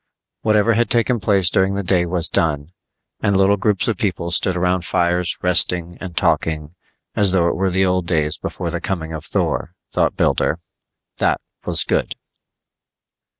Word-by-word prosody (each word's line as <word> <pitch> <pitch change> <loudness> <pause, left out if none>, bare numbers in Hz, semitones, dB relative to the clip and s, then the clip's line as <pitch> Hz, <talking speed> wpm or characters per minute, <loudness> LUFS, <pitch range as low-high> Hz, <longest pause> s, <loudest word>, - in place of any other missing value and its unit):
Whatever 110 +1 +3
had 115 +2 +1
taken 120 0 +1
place 95 -3 +3
during 95 +1 +1
the 100 - -2
day 90 -1 +2
was 85 -1 +1
done, 75 -1 -1 0.5
and 100 -1 +2
little 95 +1 +4
groups 100 0 0
of 110 -4 0
people 90 -4 -2
stood 90 0 +2
around 90 0 0
fires 90 +1 0
resting 90 -1 +1
and 90 -3 -8
talking 80 -2 0 0.4
as 100 -2 +3
though 85 -3 +3
it - - -2
were 95 0 0
the 95 +1 +2
old 90 -1 0
days 75 -3 0
before 85 -2 -5
the 85 - -4
coming 80 -4 -4
of 80 -2 -6
Thor, 90 - -2 0.2
thought - - +1
Builder. 80 - +1 0.6
That - - +1 0.3
was - - +4
good. - - -1
90 Hz, 165 wpm, -19 LUFS, 85-95 Hz, 0.6 s, little